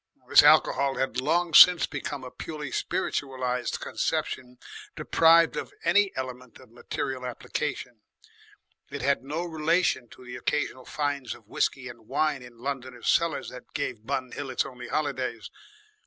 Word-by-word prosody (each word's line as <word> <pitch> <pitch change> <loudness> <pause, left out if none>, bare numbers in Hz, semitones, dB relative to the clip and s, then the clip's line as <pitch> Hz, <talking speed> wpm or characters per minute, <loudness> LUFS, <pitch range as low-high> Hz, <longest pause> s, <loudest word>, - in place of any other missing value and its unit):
This - - +8
Alcohol 140 -1 +4
had 130 -2 -1
long 165 +4 +1
since 180 +2 +9
become 145 -3 -5
a 125 - -8
purely 150 -4 -7
spiritualised 130 -7 -2
conception 125 -1 -3 0.4
deprived 165 0 +4
of - - -5
any 195 +4 +3
element 125 -2 -6
of 130 -3 -18
material 130 +2 -4
application; 125 -1 -4 0.9
it 140 -2 -6
had 140 -1 +1
no 155 +5 -3
relation 160 -6 0
to 125 - -15
the 125 0 -7
occasional 130 0 -2
finds 145 -3 -3
of 110 - -19
whiskey 130 +4 -1
and 120 -3 -12
wine 145 0 0
in 125 -1 -13
Londoners' 130 -1 -4
cellars 165 -3 +1
that 125 - -13
gave 125 -6 -3
Bun 130 -2 -2
Hill 145 -1 -6
its 130 - 0
only 125 -2 -9
holidays. 130 -7 -3
135 Hz, 145 wpm, -27 LUFS, 125-150 Hz, 0.9 s, since